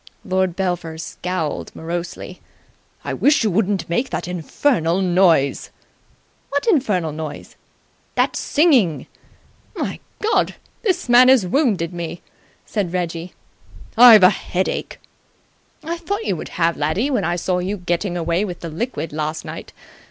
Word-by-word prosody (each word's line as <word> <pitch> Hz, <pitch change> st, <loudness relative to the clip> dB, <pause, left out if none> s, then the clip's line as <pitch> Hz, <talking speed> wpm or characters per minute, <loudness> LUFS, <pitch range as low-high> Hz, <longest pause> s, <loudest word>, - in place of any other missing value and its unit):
Lord 185 Hz, -3 st, 0 dB
Belpher 175 Hz, -4 st, -2 dB
scowled 165 Hz, -1 st, -4 dB
morosely. 175 Hz, +2 st, -6 dB, 0.6 s
"I -, -, -2 dB
wish 290 Hz, -3 st, +3 dB
you 215 Hz, -, +1 dB
wouldn't 195 Hz, -2 st, 0 dB
make 240 Hz, +10 st, -1 dB
that -, -, -4 dB
infernal 180 Hz, -, 0 dB
noise!" 175 Hz, -6 st, +2 dB, 0.8 s
"What 285 Hz, +1 st, -1 dB
infernal 215 Hz, -, +1 dB
noise?" 155 Hz, -1 st, -7 dB, 0.6 s
"That -, -, +1 dB
singing!" 265 Hz, -, +2 dB, 0.7 s
"My -, -, -3 dB, 0.2 s
God! 440 Hz, +1 st, +1 dB, 0.3 s
This 370 Hz, -, 0 dB
man 245 Hz, +1 st, +7 dB
has 260 Hz, -7 st, +5 dB
wounded 185 Hz, -, +1 dB
me!" 170 Hz, 0 st, -6 dB, 0.4 s
said 200 Hz, -6 st, -2 dB
Reggie. 175 Hz, -1 st, -3 dB, 0.6 s
"I've 230 Hz, -4 st, +9 dB
a 185 Hz, -, +8 dB
headache." 185 Hz, +1 st, -3 dB, 0.8 s
"I 335 Hz, +2 st, -4 dB
thought 405 Hz, +6 st, -3 dB
you -, -, 0 dB
would 155 Hz, -, -7 dB
have, 170 Hz, -1 st, +1 dB
laddie, 160 Hz, -, 0 dB
when 240 Hz, -7 st, 0 dB
I 170 Hz, +1 st, 0 dB
saw 180 Hz, +1 st, -1 dB
you 190 Hz, +3 st, -2 dB
getting 175 Hz, 0 st, -2 dB
away 170 Hz, +3 st, 0 dB
with 180 Hz, -4 st, -6 dB
the 170 Hz, -, -5 dB
liquid 165 Hz, -, -4 dB
last 155 Hz, +1 st, -3 dB
night. -, -, -8 dB
180 Hz, 135 wpm, -20 LUFS, 170-235 Hz, 0.8 s, I've